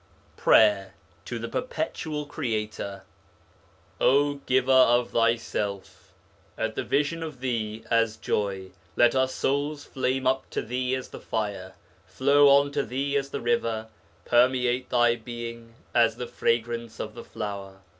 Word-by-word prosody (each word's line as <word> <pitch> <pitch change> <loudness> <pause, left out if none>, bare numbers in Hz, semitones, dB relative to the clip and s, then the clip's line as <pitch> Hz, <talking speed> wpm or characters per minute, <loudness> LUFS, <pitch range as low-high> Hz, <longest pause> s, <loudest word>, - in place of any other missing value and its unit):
PRAYER 100 -3 +4 0.3
TO 120 - -4
THE 115 0 -5
PERPETUAL 160 - -3
CREATOR 110 -8 -4 1.0
O 145 +2 +4
giver 130 0 +2
of 125 -2 +5
thyself! 115 -4 -1 0.5
at - - -1
the - - -3
vision 150 +3 0
of 155 -5 -6
thee 115 -4 -3
as 115 -1 +2
joy 95 -2 -2 0.2
let 120 -1 +5
our 130 0 +3
souls 145 +3 -2
flame 130 0 -1
up 130 +1 +1
to - - -3
thee 125 +2 -1
as 130 - -6
the - - -9
fire, 100 -4 -3 0.3
flow 140 +2 +4
on 140 +1 +5
to 145 0 0
thee 140 +3 -2
as 140 -1 0
the - - -4
river, 115 -2 -1 0.4
permeate 125 +1 +2
thy 120 -1 +3
being 115 0 -8 0.2
as 115 -1 +4
the 125 - -5
fragrance 115 -1 -2
of 110 - -5
the 120 - -9
flower. 100 -2 -6
120 Hz, 140 wpm, -26 LUFS, 110-130 Hz, 1.0 s, of